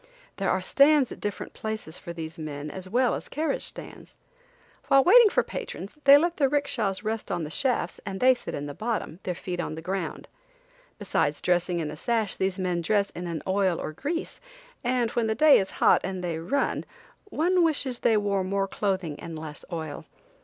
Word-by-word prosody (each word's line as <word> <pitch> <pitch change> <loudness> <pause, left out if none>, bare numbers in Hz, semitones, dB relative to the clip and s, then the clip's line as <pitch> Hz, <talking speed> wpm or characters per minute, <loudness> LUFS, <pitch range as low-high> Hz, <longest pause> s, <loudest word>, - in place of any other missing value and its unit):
There - - 0
are - - +1
stands 280 -2 +4
at - - -8
different 205 -1 -5
places 220 -7 -5
for 170 - -7
these 165 -1 -7
men 150 -1 -5
as 185 +2 -7
well 245 +3 +2
as - - -5
carriage 320 - -1
stands. - - -9 0.7
While 275 -1 +6
waiting 450 - +8
for - - +2
patrons 195 - -6
they 280 +1 +10
let 340 +3 0
their 275 -3 +3
'rickshas 240 -9 -1
rest 220 0 -3
on 175 - -1
the 150 - -6
shafts 255 +7 0
and 195 -2 -5
they 255 +1 +6
sit 250 - -6
in 145 - -4
the 145 - -6
bottom, 215 -4 -3
their 180 - -3
feet 175 0 -5
on 155 - -3
the 160 - -7
ground. 190 +2 -4 0.7
Besides - - 0
dressing 175 0 +1
in 155 -2 -3
a - - -7
sash 220 +4 -1
these 190 0 -1
men 180 -2 -1
dress 200 +3 +1
in 175 0 -6
an 165 -2 -4
oil 190 -2 +1
or - - -4
grease, 315 - -4 0.4
and 245 -2 +1
when 235 -2 0
the 220 - 0
day 305 +2 +7
is 195 - -2
hot - - +5
and 185 -1 -4
they 170 -2 -2
run, 270 +13 -1 0.4
one 360 -1 +2
wishes 280 -6 +1
they 225 -2 +3
wore 200 -2 0
more 195 +1 -1
clothing 190 -7 -2
and 165 -1 -7
less 155 -1 -8
oil! 160 -3 -5
195 Hz, 200 wpm, -26 LUFS, 170-255 Hz, 0.7 s, they